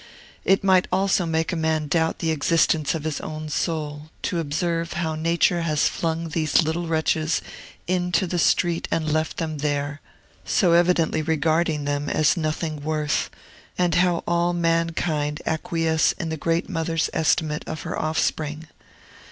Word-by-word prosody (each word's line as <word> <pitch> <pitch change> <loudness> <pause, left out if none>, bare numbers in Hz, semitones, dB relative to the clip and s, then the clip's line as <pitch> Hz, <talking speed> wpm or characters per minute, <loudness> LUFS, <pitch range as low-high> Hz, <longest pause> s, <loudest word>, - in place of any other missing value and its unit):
It 195 0 +3
might 190 -2 +4
almost 190 0 +2
make 160 +1 0
a - - 0
man 160 -1 0
doubt 160 +2 +1
the 165 - -1
existence 160 0 +2
of 155 - -4
his 155 -2 -3
own 155 0 -6
soul, 150 -1 -3
to 175 - -1
observe 165 +2 -1
how 160 -2 -1
Nature 170 +2 +1
has 155 -3 +2
flung 165 0 -2
these 155 +1 +2
little 165 +2 -2
wretches 160 0 +1 0.5
into 180 0 +1
the 175 0 -2
street 170 0 +2
and 155 -2 0
left 155 0 -1
them 155 -2 -3
there, 145 0 -2 0.4
so 180 -5 +2
evidently 170 -2 +3
regarding 160 0 +1
them 145 0 -1
as 155 -2 +3
nothing 155 -1 -2
worth, 150 -1 -1 0.5
and 180 -2 +2
how 180 -1 +2
all 175 0 +1
mankind 165 -3 0
acquiesce 160 0 +1
in 170 -4 -5
the 160 - -2
great 165 +3 -1
mother's 165 -3 -1
estimate 155 -1 +1
of 160 - -5
her - - -4
offspring. 155 0 -1
160 Hz, 150 wpm, -23 LUFS, 155-170 Hz, 0.5 s, might